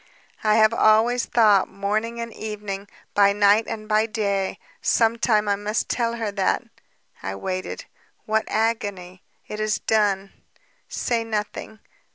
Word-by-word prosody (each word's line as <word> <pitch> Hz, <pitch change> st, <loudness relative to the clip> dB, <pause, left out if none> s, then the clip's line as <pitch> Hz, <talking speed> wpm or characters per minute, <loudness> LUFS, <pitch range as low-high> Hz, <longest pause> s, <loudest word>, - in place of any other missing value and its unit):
"I 215 Hz, -1 st, +4 dB
have 220 Hz, 0 st, +5 dB
always 230 Hz, +3 st, +3 dB
thought, 210 Hz, -5 st, +4 dB
morning 215 Hz, +4 st, -2 dB
and 230 Hz, -1 st, -5 dB
evening, 210 Hz, -2 st, -6 dB, 0.3 s
by 200 Hz, -1 st, +5 dB
night 205 Hz, +2 st, +4 dB
and 215 Hz, -1 st, -6 dB
by 215 Hz, +1 st, +2 dB
day, 200 Hz, -3 st, -1 dB, 0.2 s
'Some 230 Hz, 0 st, +2 dB
time 215 Hz, -3 st, +2 dB
I 200 Hz, -, +2 dB
must 205 Hz, +2 st, -2 dB
tell 235 Hz, -1 st, 0 dB
her 225 Hz, -3 st, -3 dB
that 195 Hz, -1 st, 0 dB, 0.3 s
...' -, -, -44 dB
I 95 Hz, 0 st, -4 dB
waited... 185 Hz, -, -4 dB, 0.4 s
What 220 Hz, 0 st, +1 dB
agony!... 205 Hz, -5 st, -2 dB, 0.3 s
It 210 Hz, -, -6 dB
is 215 Hz, 0 st, 0 dB
done. 200 Hz, -3 st, 0 dB, 0.6 s
Say 235 Hz, -2 st, -1 dB
nothing. 215 Hz, 0 st, -5 dB
215 Hz, 145 wpm, -23 LUFS, 200-225 Hz, 0.6 s, have